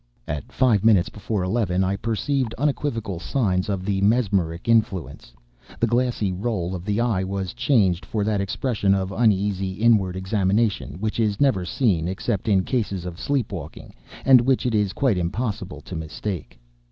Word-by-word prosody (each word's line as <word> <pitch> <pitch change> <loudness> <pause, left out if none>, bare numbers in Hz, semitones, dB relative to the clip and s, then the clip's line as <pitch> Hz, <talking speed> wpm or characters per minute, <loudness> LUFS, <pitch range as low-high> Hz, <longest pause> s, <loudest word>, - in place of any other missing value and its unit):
At 75 -3 -5
five 115 -7 +2
minutes 105 -6 +4
before 105 -2 -3
eleven 95 -2 0
I 95 +1 0
perceived 115 +4 -1
unequivocal 120 - -1
signs 95 -4 0
of 95 -2 -2
the 100 -1 0
mesmeric 100 -6 +1
influence. 95 - 0 0.5
The - - +3
glassy 120 -4 0
roll 95 -2 -2
of 90 -1 -6
the 105 +1 0
eye 115 -6 +1
was 95 -1 -3
changed 115 -8 +2
for 105 -2 -2
that 105 -1 0
expression 100 -1 0
of 95 0 -2
uneasy 100 -3 +1
inward 105 -3 +2
examination 95 0 0
which 110 +2 -2
is 105 -3 +1
never 130 -11 +2
seen 90 -7 +1
except 100 +3 -2
in 95 -3 +3
cases 100 -8 -2
of 90 -1 -7
sleep 135 -6 -1
waking, 80 -5 -8 0.3
and 130 -2 +7
which 130 +1 +1
it 125 - 0
is 105 -3 +1
quite 120 -7 +1
impossible 90 -4 -3
to 90 - -8
mistake. 80 0 -5
100 Hz, 165 wpm, -23 LUFS, 95-115 Hz, 0.5 s, and